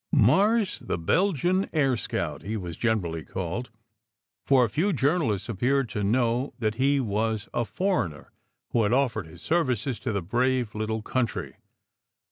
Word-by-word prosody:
"Mars, 210 +1 +3
the - - -3
Belgian 180 - +1
Air 135 -5 +3
Scout," - - -3
he 110 +2 -3
was 90 -4 -5
generally 90 -9 -1
called, 95 +6 -4 0.8
for 130 -3 +5
few 175 - 0
journalists 140 - +1
appeared 125 +4 +1
to 105 -1 -3
know 120 +4 +1
that 110 -4 0
he 140 +1 +3
was 110 -2 -1
a 120 - +1
for 180 - 0
eigner 75 - -13 0.5
who 120 - +2
had 105 +1 +2
offered 115 -9 +1
his 80 - -14
services 135 -7 0
to 130 - -2
the 100 -4 -2
brave 125 +3 0
little 110 0 -2
coun 130 0 +1
try. - - -6
120 Hz, 155 wpm, -26 LUFS, 105-140 Hz, 0.8 s, for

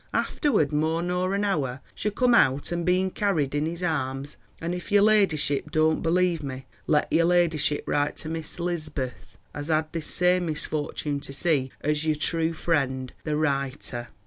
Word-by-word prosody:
Afterward 215 - +1
more 160 +3 0
nor 180 +2 0
an 200 - 0
hour, 140 -10 -1
she 210 - -2
cum 245 +4 +2
out 140 - +3
ain 170 0 -1
being 185 +2 +2
carred 165 -11 0
in 145 +1 0
his 170 +2 -5
harmes. 135 -4 -2 0.2
And 170 +2 -3
if 180 +2 -6
your 205 0 +5
ladishipp 165 -9 +2
dont 155 0 +2
believ 175 0 +2
me, 135 -2 -6 0.2
let 150 -1 +2
your 165 0 +4
ladishipp 165 -4 +2
rite 145 0 0
to - - -5
miss 160 -1 -3
elizbeth, 155 -7 -4 0.2
as 145 0 -5
had 155 -1 0
this 165 -2 -4
same 180 0 +3
misfortune 150 -1 -2
to 140 - -8
see 140 -3 +1
as 150 +1 0
your 155 -1 +1
tru 160 +2 0
frend, 135 -6 -1
"THE 150 -1 0
RITER." 140 -4 -1
155 Hz, 170 wpm, -26 LUFS, 145-175 Hz, 0.2 s, your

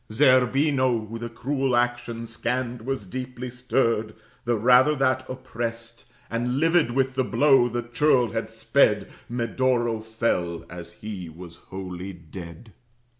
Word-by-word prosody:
Zerbino, 130 -1 +3
who 115 +2 -6
the 120 0 -5
cruel 135 +2 -1
action 120 -1 -1
scanned, 120 +1 -3
Was 135 -6 -2
deeply 125 +4 -6
stirred, 115 -3 0 0.3
the 120 -1 +1
rather 125 +6 +5
that, 130 -1 +1
opprest, 115 -2 -5 0.2
And 120 +2 -1
livid 165 -4 +3
with 130 +1 +1
the 130 0 +1
blow 135 -2 +4
the 120 0 -2
churl 120 -1 +2
had - - -3
sped, - - +2 0.2
Medoro 120 -1 0
fell 110 -7 -2
as 85 -1 -8
he 95 -6 -5
was 85 +1 -11
wholly 95 0 -6
dead. 85 +4 -11
120 Hz, 130 wpm, -25 LUFS, 110-130 Hz, 0.3 s, rather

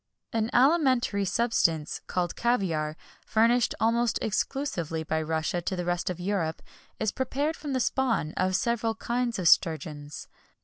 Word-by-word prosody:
An 225 0 0
alimentary 255 -7 +3
substance, 180 -7 +1
called 175 -2 -1
caviar, 165 -10 0 0.3
furnished 230 +1 +2
almost 230 +1 +2
exclusively 190 - -2
by 160 0 -1
Russia 160 +2 -1
to 185 +2 -2
the 180 -1 -3
rest 175 0 -1
of 180 -1 -4
Europe, 175 -4 -2 0.4
is 220 -2 0
prepared 280 +4 -1
from 290 -3 -5
the 260 - +1
spawn 235 - 0
of 185 0 +1
several 230 +1 0
kinds 240 +1 -1
of 180 -3 0
sturgeons. 155 -4 +1
200 Hz, 140 wpm, -27 LUFS, 165-240 Hz, 0.4 s, alimentary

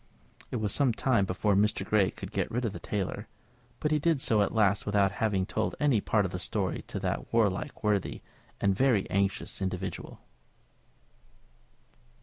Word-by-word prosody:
It - - -4
was 110 -4 -1
some 135 -5 +3
time 115 -4 +2
before 95 +2 0
Mr. 105 +2 +2
Grey 100 -4 +3
could - - -9
get - - -1
rid 125 +2 -2
of 105 - -2
the - - -6
tailor, 100 -3 -3 0.5
but 150 - 0
he 155 - +3
did 160 -1 +2
so 110 -6 +3
at 100 - +1
last 105 -3 +2
without 100 -2 +2
having 100 -4 +1
told 110 +3 -2
any 140 -8 +3
part 105 -1 +1
of 95 - -3
the 90 - -4
story 95 -1 -1
to - - -4
that - - -3
warlike, 100 -6 0
worthy, 105 -3 0 0.4
and 100 -1 +2
very 125 -4 +2
anxious 100 +1 -1
individual. 95 0 -4
105 Hz, 170 wpm, -29 LUFS, 95-115 Hz, 0.5 s, some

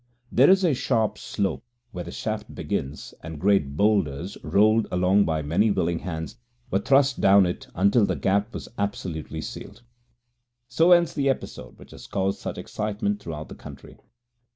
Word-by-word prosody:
There 130 +4 +5
is 190 0 +5
a 170 -5 +3
sharp 115 -4 0
slope 100 -2 -3 0.3
where 90 - -5
the - - -8
shaft - - -5
begins, 70 +3 -4
and 80 -2 -8
great 90 -7 +1
boulders, 100 -4 +1
rolled 110 +2 +3
along 90 +3 +3
by 80 -1 -1
many 90 +9 +2
willing 85 -4 0
hands, 80 +4 -6 0.3
were 95 - +2
thrust 135 +3 +3
down 100 0 +6
it 90 - -4
until 100 +4 +3
the - - -1
Gap 100 +3 0
was - - -7
absolutely 80 -6 -4
sealed. - - -9 0.8
So 160 +8 +3
ends 175 -1 +5
the 140 -2 0
episode 65 - -4
which - - -15
has - - -12
caused 95 0 -1
such - - -5
excitement 105 -1 -3
throughout 80 -5 -7
the - - -10
country. - - -12
100 Hz, 165 wpm, -25 LUFS, 85-110 Hz, 0.8 s, down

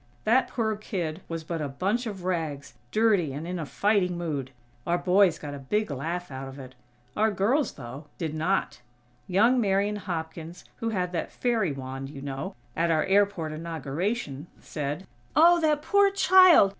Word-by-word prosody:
That 245 +4 +3
poor 220 -3 -1
kid 185 -6 -4
was 165 -1 -4
but 165 0 -4
a 145 - -2
bunch 200 - -1
of 195 -4 -6
rags, 155 -8 -3 0.2
dirty, 205 -10 +3
and 150 +4 -5
in 180 0 -3
a 155 - -4
fighting 195 -3 +1
mood. 150 -6 -3 0.4
Our 175 - +2
boys 185 0 +4
got 145 -1 -7
a 140 - -6
big 210 +8 -1
laugh 165 +5 -4
out 135 0 -6
of 135 +1 -9
it. 130 -2 -10 0.4
Our 220 +1 +3
girls, 220 - +1
though, 135 +3 -9
did 160 -3 -3
not. 165 -3 -1 0.5
Young 230 +7 +4
Marian 200 0 +1
Hopkins, 165 -3 -6
who 230 -2 -2
had 180 -5 -1
that 170 - -3
fairy 225 -9 0
wand, 135 0 -6
you 140 -1 -9
know, 135 -1 -5 0.2
at 170 +1 +1
our 155 -2 +3
airport 195 -5 +2
inauguration, 160 - -3
said: 150 +4 -4 0.3
"Oh, 340 +3 +6
that 300 -2 +2
poor 405 +2 +4
child! 370 - +7
175 Hz, 170 wpm, -27 LUFS, 150-210 Hz, 0.5 s, child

